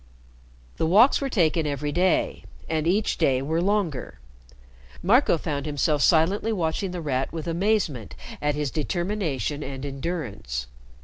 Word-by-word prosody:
'" - - -28
The 160 - +1
walks 220 - +5
were 275 - -1
taken 165 -8 +2
every 145 0 -2
day, 180 +3 +1 0.2
and 160 0 -1
each 205 +5 +1
day 135 -6 +3
were 160 +5 -1
longer. 180 - -1 0.8
Marco 215 0 +4
found 150 -2 -3
himself 145 0 +1
silently 180 +9 +3
watching 180 -1 -1
The 180 -1 -5
Rat 135 -3 -1
with 160 -2 -5
amazement 170 - 0 0.3
at 150 0 0
his 145 -3 -2
determination 155 - -2
and 135 -1 -6
endurance. 130 - -4
160 Hz, 140 wpm, -25 LUFS, 140-180 Hz, 0.8 s, walks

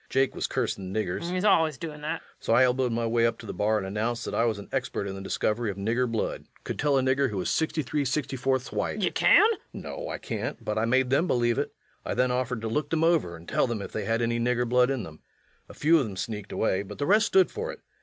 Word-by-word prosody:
Jake 135 0 +2
was - - -2
cursing 95 -1 -2
niggers. 95 -3 -2
LUKE. 175 - -3
He's 185 +2 0
allus 160 -8 +4
doin' 150 +1 -7
that. 155 +2 -3
REVENUE. - - -25
So - - 0
I 130 - +6
elbowed 125 0 +2
my 115 0 -1
way 115 0 +3
up 115 0 -2
to - - -11
the - - -5
bar 110 +1 +1
and 100 - -3
announced 110 +5 -2
that - - -4
I 115 - +2
was 110 -3 0
an 100 - -9
expert 130 -6 -2
in 100 - -4
the 95 - -7
discovery 110 +3 -1
of 100 - -5
nigger 115 +5 0
blood... 110 - -2 0.2
could - - -5
tell 145 -2 +3
a 130 - +2
nigger 130 +1 +2
who 105 - -4
was 90 - -1
63 155 -2 0
64ths 130 -1 -1
white. - - -1
LUKE. - - -2
Ye - - +2
kin? - - +1
REVENUE. 425 - +7 0.3
No, - - -6
I - - -3
can't, - - -5
but 105 0 -1
I 110 - +1
made 130 +2 +2
them 160 +6 +3
believe 120 -4 +2
it. - - -3 0.3
I - - -3
then 125 0 +2
offered 125 -2 -1
to 115 - -3
look 145 +6 -1
them 160 0 +1
over 165 - +2
and 85 +1 -13
tell - - +1
them 120 -3 -2
if 100 - -7
they 110 - -3
had 115 +1 +1
any 115 0 0
nigger 120 +1 +1
blood 125 +1 +4
in 135 -5 -1
them. 80 -3 -10 0.5
A - - -11
few 165 +2 +4
of - - +1
them 100 -3 -7
sneaked 105 -1 -5
away, 95 -3 +1
but 100 - -9
the 145 - -1
rest 210 +5 +4
stood 380 -1 +4
for 470 +2 -4
it. - - -12
125 Hz, 280 wpm, -27 LUFS, 110-145 Hz, 0.5 s, REVENUE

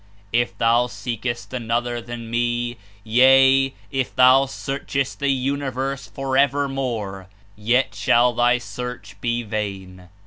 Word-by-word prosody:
If 120 +1 0
thou 120 +2 +3
scekest 120 +3 -5
another 120 0 -2
than 120 0 -8
Me; 120 0 -1 0.3
yea, 135 +3 +5 0.2
if 135 -2 -2
thou 130 +2 +6
scarchcst 135 0 -3
the 140 -1 0
universe 135 0 -2
forevermore, 135 -7 -1 0.3
yet 120 +5 +1
shall 120 +1 +3
thy 120 +1 +3
search 125 -4 -7
he 120 0 -1
vain. 95 -4 -5
120 Hz, 110 wpm, -22 LUFS, 115-135 Hz, 0.3 s, thou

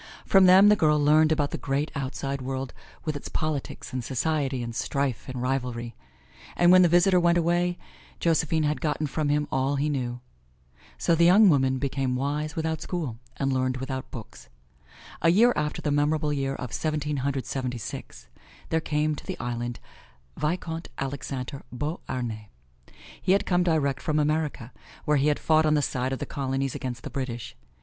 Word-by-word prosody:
From 195 -1 +6
them 190 +3 +8
the 210 - +6
girl 150 -5 +3
learned 155 +2 +4
about 145 -2 +1
the - - -4
great, 140 +2 -1
outside 135 0 -3
world 130 0 -4 0.3
with 155 -2 -1
its 145 - -6
politics 155 -5 -4
and 130 -1 -2
society 135 -1 -1
and 115 0 -5
strife 135 0 -2
and 130 -1 -5
rivalry; 125 -3 -2 0.6
and 175 0 +5
when 185 0 +8
the 180 - +6
visitor 180 +2 +5
went 170 0 +3
away 175 +1 +1 0.4
Josephine 160 -1 +2
had 150 0 0
gotten 155 -1 0
from 150 +1 -1
him 150 0 +1
all 135 +2 +1
he 145 +2 0
knew. 125 -4 -2 0.8
So 170 - +2
the 170 +1 +4
young 195 +4 +7
woman 130 -4 +3
became 135 -1 -1
wise 150 +4 -2
without 160 -1 -2
school 150 -11 -4 0.2
and 135 -1 0
learned 130 0 0
without 130 0 -5
books. 110 - -10 0.7
A 165 - +4
year 230 +8 +5
after 150 0 -2
the 150 - 0
memorable 150 +1 +1
year 135 -1 -1
of 125 -3 -6
Seventeen 150 -2 -1
Hundred 135 0 -2
Seventy 125 -2 -3
six, 65 - -8 0.4
there 160 - +1
came 150 0 0
to 150 - -8
the - - -4
island, 120 0 -4 0.6
Vicomte 165 +2 -3
Alexander 135 0 -4
Beauharnais. 125 - -4 0.7
He 185 - +3
had 200 - +2
come 180 -1 +2
direct 150 -6 +1
from 155 -1 0
America, 150 -5 -1 0.3
where 150 0 +3
he 140 +2 +2
had 150 - +2
fought 155 0 +3
on 155 - +3
the 145 - +2
side 130 0 -1
of 135 - -1
the - - -4
Colonies 135 -1 -2
against 125 -2 -5
the - - -7
British. 125 -4 -5
145 Hz, 180 wpm, -26 LUFS, 130-160 Hz, 0.8 s, them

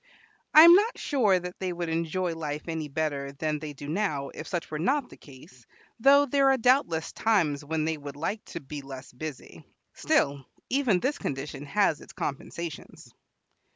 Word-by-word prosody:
I 310 - +12
am 340 +1 +10
not 420 +6 +3
sure 220 -10 +2
that 180 0 -8
they 185 -1 -2
would 175 -1 -4
enjoy 165 +2 -1
life 150 -2 -5
any 160 -2 -3
better 140 -2 -3
than 150 +2 -2
they 150 -1 -7
do 145 +1 -9
now 155 -5 -1
if 155 - -9
such 175 -3 -4
were 150 - -3
not 265 - 0
the - - -11
case, 130 -3 -16 0.3
though 280 +4 +6
there 275 0 +3
are 270 - +4
doubtless 230 - +2
times 170 -11 +1
when 155 +1 -2
they 160 0 -1
would 140 -1 -8
like 195 +8 -3
to - - -7
be 145 +1 -8
less 135 -1 -10
busy. 145 +1 -8 0.3
Still, 140 -1 +1 0.3
even 250 -9 +2
this 285 +3 -1
condition 140 +1 -5
has 195 -2 +1
its - - -13
compensations. 155 +2 -6
160 Hz, 180 wpm, -27 LUFS, 145-210 Hz, 0.3 s, I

